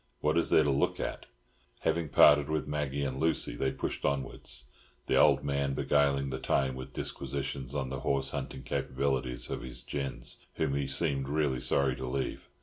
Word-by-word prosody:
What 75 +1 +1
is 85 - +2
there 80 - +6
to 70 - +2
look 70 - +1
at?" - - -4 0.5
Having 80 -1 0
parted 75 +1 +6
with 80 -1 -1
Maggie 70 -1 -1
and 65 -1 -2
Lucy, 80 -5 +1
they 65 - 0
pushed 65 - -4
onwards, 70 -3 -3 0.4
the - - +1
old - - +5
man 70 -1 0
beguiling 70 -1 +2
the 65 - -3
time 65 0 +1
with 65 0 -7
disquisitions 70 0 -4
on 65 -2 -1
the 65 0 -4
horse 70 -1 +1
hunting 65 -2 -5
capabilities 65 -1 -1
of - - -3
his - - -6
gins, 70 -3 -5
whom 70 - 0
he 70 -1 0
seemed 70 -1 0
really 75 -3 +1
sorry 65 0 +2
to 65 - -4
leave. 65 +1 -3
70 Hz, 180 wpm, -31 LUFS, 65-70 Hz, 0.5 s, there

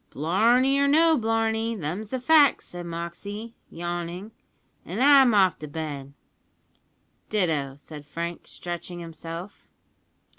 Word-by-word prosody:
"Blarney 235 - +2
or 280 - +3
no 320 +3 +5
blarney, 225 -1 0
them's 190 +4 -4
the 260 - -3
facts," 290 +1 +4
said 175 -1 -8
Moxey, 190 +7 -6 0.2
yawning, 175 +4 -5 0.5
"an' - - -5
I'm 270 -3 +6
off 190 -4 +3
to 150 - -7
bed." 145 -3 -6 1.2
"Ditto," 155 -10 0
said 145 0 -12
Frank, 170 +3 -5
stretching 175 0 -6
himself. 165 +3 -9
180 Hz, 115 wpm, -25 LUFS, 165-230 Hz, 1.2 s, I'm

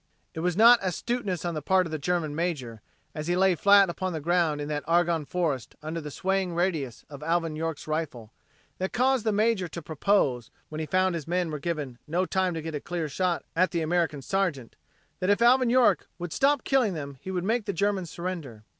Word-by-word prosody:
It - - -6
was 175 +1 -1
not 235 +2 +8
astuteness 190 -1 -2
on 170 - -1
the 155 - -3
part 185 +4 +3
of 165 - -7
the 155 - -3
German 165 -1 -1
major, 145 -10 -3 0.3
as 155 +1 -5
he 175 - +1
lay 190 0 +4
flat 200 +3 +6
upon 185 +1 -3
the 160 - -3
ground 165 -1 +1
in 145 - -4
that 150 -1 -3
Argonne 170 -2 +2
Forest 145 -7 -2
under 160 +2 -4
the 150 - -6
swaying 190 +2 -1
radius 160 -9 -1
of 145 -1 -10
Alvin 165 0 0
York's 160 -1 -4
rifle, 145 -8 -4 0.5
that 190 +1 -2
caused 255 -1 +2
the - - +4
major 210 -3 +1
to 170 - -7
propose, 150 - 0 0.2
when 155 - -6
he 155 - -3
found 185 +3 +2
his 165 -3 -5
men 175 -1 0
were 150 - -4
given 145 -6 -4
no 175 +4 0
time 185 -2 0
to 160 - -4
get 160 0 -5
a 145 - -3
clear 175 -2 -3
shot 175 +3 -1
at 185 +2 +3
the 170 - -1
American 160 -3 0
sergeant, 175 -9 -1 0.4
that 185 - 0
if 205 - +4
Alvin 245 +1 +5
York 250 0 +3
would 175 -2 -5
stop 280 +1 +2
killing 250 -9 +2
them 140 -3 -7
he - - -7
would 180 -2 -2
make 225 +2 0
the 200 - -1
Germans 195 -1 -1
surrender. 165 -11 -6
170 Hz, 215 wpm, -27 LUFS, 155-190 Hz, 0.5 s, not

